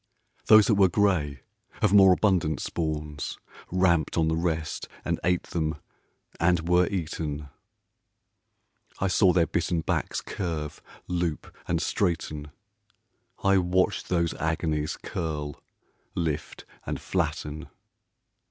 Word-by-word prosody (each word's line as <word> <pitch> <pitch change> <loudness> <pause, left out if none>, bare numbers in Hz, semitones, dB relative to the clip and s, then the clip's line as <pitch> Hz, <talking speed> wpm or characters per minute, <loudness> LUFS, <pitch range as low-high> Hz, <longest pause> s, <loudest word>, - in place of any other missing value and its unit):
Those 110 -1 +8
that 115 - +3
were 95 - +8
gray, 80 - +1 0.4
of 105 -2 +2
more 95 -2 +8
abundant 90 -7 +2
spawns, 75 -3 -3 0.3
Ramped 85 -4 +2
on 80 -1 +3
the 80 - +1
rest 80 -2 -2 0.2
and - - 0
ate 90 +1 +2
them 80 -2 -2 0.6
and 85 0 +2
were 90 0 +4
eaten. 75 -5 -3 1.5
I 95 - 0
saw 95 +1 +4
their 85 -2 +3
bitten 85 0 -1
backs - - -1
curve, 80 -5 -4 0.3
loop, 85 -3 -2
and - - +1
straighten, 75 -4 -1 0.9
I 100 -1 +5
watched 90 +1 +1
those 85 -2 +1
agonies 80 -1 -1
curl, 75 -3 -4 0.5
lift, 80 -3 -3 0.2
and - - -2
flatten. 75 +1 -2
85 Hz, 115 wpm, -27 LUFS, 75-90 Hz, 1.5 s, Those